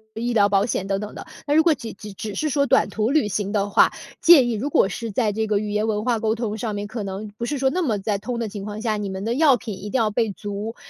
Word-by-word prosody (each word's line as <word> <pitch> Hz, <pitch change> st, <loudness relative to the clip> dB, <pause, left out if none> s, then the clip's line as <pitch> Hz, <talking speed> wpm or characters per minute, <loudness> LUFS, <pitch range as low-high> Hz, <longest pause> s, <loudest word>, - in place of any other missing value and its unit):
医 240 Hz, +2 st, -2 dB
疗 205 Hz, -3 st, +4 dB
保 195 Hz, 0 st, +3 dB
险 205 Hz, -5 st, -2 dB
等 195 Hz, 0 st, 0 dB
等 210 Hz, 0 st, -7 dB
的。 -, -, -8 dB, 0.2 s
那 290 Hz, -, +2 dB
如 320 Hz, -, +6 dB
果 330 Hz, -1 st, +5 dB
只 235 Hz, -5 st, -7 dB
只 210 Hz, +1 st, -10 dB
只 210 Hz, +1 st, -6 dB
是 305 Hz, +8 st, -1 dB
说 280 Hz, 0 st, +2 dB
短 270 Hz, -1 st, +3 dB
途 215 Hz, +1 st, -1 dB
旅 280 Hz, -8 st, +2 dB
行 205 Hz, +1 st, -2 dB
的 205 Hz, -1 st, 0 dB
话， -, -, +4 dB, 0.3 s
建 320 Hz, -8 st, +7 dB
议 225 Hz, -, -1 dB
如 260 Hz, +8 st, -2 dB
果 195 Hz, -, +3 dB
是 230 Hz, +3 st, -5 dB
在 215 Hz, 0 st, 0 dB
这 220 Hz, +1 st, -2 dB
个 210 Hz, -1 st, +1 dB
语 210 Hz, 0 st, -4 dB
言 210 Hz, +1 st, 0 dB
文 210 Hz, -1 st, -1 dB
化 240 Hz, -2 st, +1 dB
沟 220 Hz, 0 st, 0 dB
通 220 Hz, -2 st, -3 dB
上 220 Hz, -1 st, -3 dB
面， 205 Hz, 0 st, -3 dB
可 220 Hz, +2 st, -5 dB
能 200 Hz, +2 st, -5 dB
不 235 Hz, -, -3 dB
是 290 Hz, +4 st, -2 dB
说 265 Hz, 0 st, +2 dB
那 360 Hz, +7 st, -1 dB
么 230 Hz, -10 st, 0 dB
在 200 Hz, +1 st, -1 dB
通 235 Hz, +4 st, -4 dB
的 230 Hz, -3 st, -2 dB
情 200 Hz, -1 st, -7 dB
况 210 Hz, +1 st, -6 dB
下， 220 Hz, -2 st, 0 dB
你 205 Hz, -1 st, -3 dB
们 190 Hz, 0 st, -5 dB
的 230 Hz, +3 st, -1 dB
药 285 Hz, -2 st, +5 dB
品 220 Hz, -2 st, -6 dB
一 210 Hz, -, -6 dB
定 260 Hz, -, 0 dB
要 220 Hz, -3 st, +1 dB
备 220 Hz, -1 st, 0 dB
足。 205 Hz, +3 st, -5 dB
220 Hz, 330 characters per minute, -23 LUFS, 205-240 Hz, 0.3 s, 建